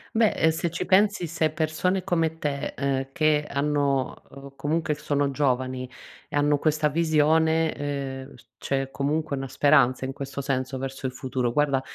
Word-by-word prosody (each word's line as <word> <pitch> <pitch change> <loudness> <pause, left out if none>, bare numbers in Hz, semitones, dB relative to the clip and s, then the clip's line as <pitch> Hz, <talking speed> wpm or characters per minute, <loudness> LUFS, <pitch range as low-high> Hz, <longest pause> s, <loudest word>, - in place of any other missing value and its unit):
Beh, 220 -1 +4
uhm, 160 - +6
se 165 +2 -2
ci 170 - -4
pensi, 200 -1 +3
se 160 -1 0
persone 160 +4 -1
come 165 -3 0
te, 145 -3 -3
ehm, 135 -1 -1
che 155 -2 +2
hanno, 140 -2 0
uhm, 140 0 -12
comunque 155 +2 -1
sono 145 -1 -1
giovani 130 -2 -1 0.4
e - - -6
hanno 145 0 +3
questa 155 -1 +2
visione, 160 +1 +2
ehm, 135 -2 -5
s 115 -2 -19 0.2
c'è 135 -1 -1
comunque 145 +1 -1
una 135 0 -4
speranza 130 -2 +3
in 135 - -4
questo 140 0 -6
senso, 130 -1 -2
verso 135 +1 -6
il 130 - -6
futuro. 130 -2 -2
Guarda, 140 -1 +2
145 Hz, 165 wpm, -25 LUFS, 135-160 Hz, 0.4 s, uhm